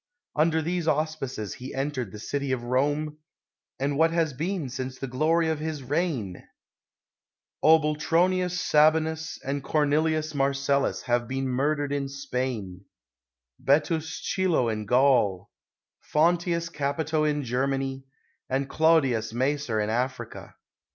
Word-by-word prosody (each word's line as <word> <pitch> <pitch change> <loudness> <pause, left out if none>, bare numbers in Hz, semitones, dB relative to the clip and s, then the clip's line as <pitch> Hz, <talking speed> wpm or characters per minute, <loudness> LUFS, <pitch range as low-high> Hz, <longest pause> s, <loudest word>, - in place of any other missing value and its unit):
Under 160 +1 +2
these 170 0 -2
auspices 150 -8 -1
he 130 +1 -8
entered 135 -6 -2
the 105 - -8
city 140 +5 -3
of 125 -2 -1
Rome 145 +5 0 0.3
— - - -64
and 140 +2 -1
what 165 0 +5
has 165 -3 0
been 165 +2 -2
since 130 0 -5
the - - -4
glory 155 +6 +1
of 160 -1 -1
his 155 -2 -4
reign 130 - -1
f - - -16 1.2
Obul 155 -1 +5
tronius 180 +3 +1
Sabinus 160 0 +2
and 140 +1 -2
Cornelius 155 +2 +1
Marcellus 140 0 +1
have 120 -1 0
been 135 +1 -2
murdered 145 +3 0
in 140 -1 -2
Spain, 125 -9 -4 0.8
Betuus 155 +3 +1
Chilo 175 -10 +1
in 110 -1 -3
Gaul, 125 -7 +3 0.6
Fonteius 170 +1 +2
Capito 155 +2 -1
in 150 -1 0
Germany, 135 +2 -1 0.5
and 135 +1 0
Clodius 135 -9 +2
Macer 130 -2 0
in 105 0 0
Africa. 125 0 -3
140 Hz, 130 wpm, -26 LUFS, 130-155 Hz, 1.2 s, what